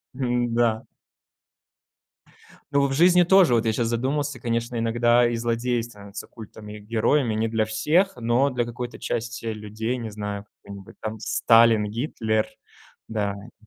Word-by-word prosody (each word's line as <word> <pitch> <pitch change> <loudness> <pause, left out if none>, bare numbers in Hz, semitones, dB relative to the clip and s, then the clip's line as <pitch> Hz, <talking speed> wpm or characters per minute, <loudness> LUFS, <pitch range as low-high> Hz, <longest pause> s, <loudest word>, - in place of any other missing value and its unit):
М-да. 120 -3 0 1.9
Ну 140 0 +3
в 135 - -3
жизни 175 +4 +5
тоже, 180 -7 +5
вот 115 - +2
я 110 - +2
сейчас 115 +1 -1
задумался, 135 +3 -1
конечно, 115 0 -2
иногда 120 +1 +3
и 120 - -2
злодей 120 +1 -1
становится 105 -3 -10
культом. 110 -1 -12
И 105 0 -8
героями 115 +3 +1
не 110 +1 0
для 110 -1 +1
всех, 150 - +1
но 120 +4 +2
для 125 -2 -1
какой-то 120 +1 -6
части 115 0 -4
людей, 110 +2 -3
не 115 -3 -6
знаю, 105 -1 -5
какой-нибудь 100 -1 -13
там 110 0 -5
Сталин, 115 0 +4
Гитлер 110 -3 -1 0.6
Да, 105 -3 -2 0.3
э - - -22
115 Hz, 145 wpm, -24 LUFS, 110-125 Hz, 1.9 s, жизни